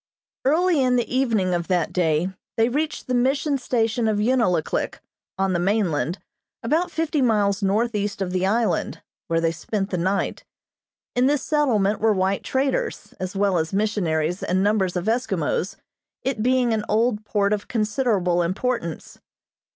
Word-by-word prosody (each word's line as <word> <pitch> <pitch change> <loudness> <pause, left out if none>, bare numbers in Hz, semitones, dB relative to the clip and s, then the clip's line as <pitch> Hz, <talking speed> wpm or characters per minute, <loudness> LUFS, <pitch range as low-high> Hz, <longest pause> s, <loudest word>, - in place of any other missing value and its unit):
Early 325 +2 +3
in 250 -1 +3
the 245 +1 -1
evening 220 -9 +1
of 170 -1 -1
that 180 -4 0
day 165 0 +1 0.3
they 225 +1 +3
reached 300 +5 -2
the 255 - -2
Mission 270 +3 +1
station 230 -2 0
of 215 -1 +1
Unalaklik, 210 -7 +1 0.4
on 190 0 +1
the 175 - +1
mainland, 180 -3 0 0.5
about 320 +9 +1
fifty 320 -3 -1
miles 210 -4 +2
northeast 205 0 0
of 190 -2 -2
the 185 0 0
island, 220 +4 0 0.2
where 165 -1 +1
they 165 0 +1
spent 195 +4 -3
the 180 - -1
night. 190 +3 -1 0.7
In 250 +1 +3
this 290 -1 +1
settlement 220 -10 +1
were 220 0 +3
white 190 0 0
traders, 275 - -1
as 185 +1 -4
well 195 -3 +2
as 160 +2 -3
missionaries 180 -5 0
and 185 +2 +1
numbers 200 -3 +1
of 180 0 -2
Eskimos, 200 - -1 0.5
it 260 -5 -1
being 250 0 +2
an 215 -1 -1
old 220 0 +1
port 205 -1 +1
of 205 -1 -3
considerable 210 -6 +1
importance. 185 0 -3
210 Hz, 155 wpm, -23 LUFS, 185-250 Hz, 0.7 s, Early